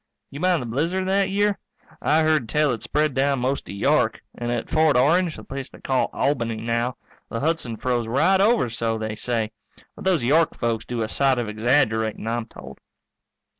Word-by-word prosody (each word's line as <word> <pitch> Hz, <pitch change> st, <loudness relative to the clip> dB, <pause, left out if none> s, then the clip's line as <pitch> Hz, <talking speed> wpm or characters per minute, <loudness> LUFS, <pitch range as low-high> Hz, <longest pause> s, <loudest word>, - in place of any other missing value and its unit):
You 140 Hz, -, -7 dB
mind 180 Hz, -4 st, +2 dB
the -, -, -6 dB
blizzard 165 Hz, +11 st, -1 dB
that 195 Hz, 0 st, +2 dB
year? 205 Hz, +1 st, +1 dB, 0.4 s
I 155 Hz, +2 st, +3 dB
heard 155 Hz, -7 st, +1 dB
tell 150 Hz, +1 st, +2 dB
it 115 Hz, -, -3 dB
spread 150 Hz, -1 st, 0 dB
down 135 Hz, +1 st, +1 dB
most 130 Hz, +3 st, -1 dB
to -, -, -8 dB
York. 100 Hz, -, +1 dB
And 120 Hz, 0 st, -3 dB
at 120 Hz, -2 st, -2 dB
Fort 155 Hz, -4 st, +3 dB
Orange, 165 Hz, +6 st, +3 dB
the -, -, -10 dB
place 135 Hz, -1 st, -6 dB
they -, -, -15 dB
call 130 Hz, -1 st, 0 dB
Albany 120 Hz, -5 st, 0 dB
now, 115 Hz, +2 st, -2 dB, 0.3 s
the 115 Hz, -, -3 dB
Hudson 150 Hz, -6 st, -1 dB
froze 120 Hz, -2 st, -1 dB
right 185 Hz, +11 st, +3 dB
over, 220 Hz, -, +3 dB
so 115 Hz, -1 st, -1 dB
they 110 Hz, -1 st, -4 dB
say. 115 Hz, -1 st, -2 dB, 0.4 s
But -, -, -10 dB
those 180 Hz, -8 st, +2 dB
York 155 Hz, +6 st, +3 dB
folks 115 Hz, -2 st, -1 dB
do 120 Hz, -2 st, -2 dB
a -, -, -2 dB
sight 135 Hz, +3 st, +2 dB
of 120 Hz, -2 st, -2 dB
exaggerating, 110 Hz, -1 st, +1 dB
I'm 115 Hz, 0 st, -2 dB
told. 65 Hz, -9 st, -12 dB
130 Hz, 195 wpm, -23 LUFS, 115-155 Hz, 0.4 s, I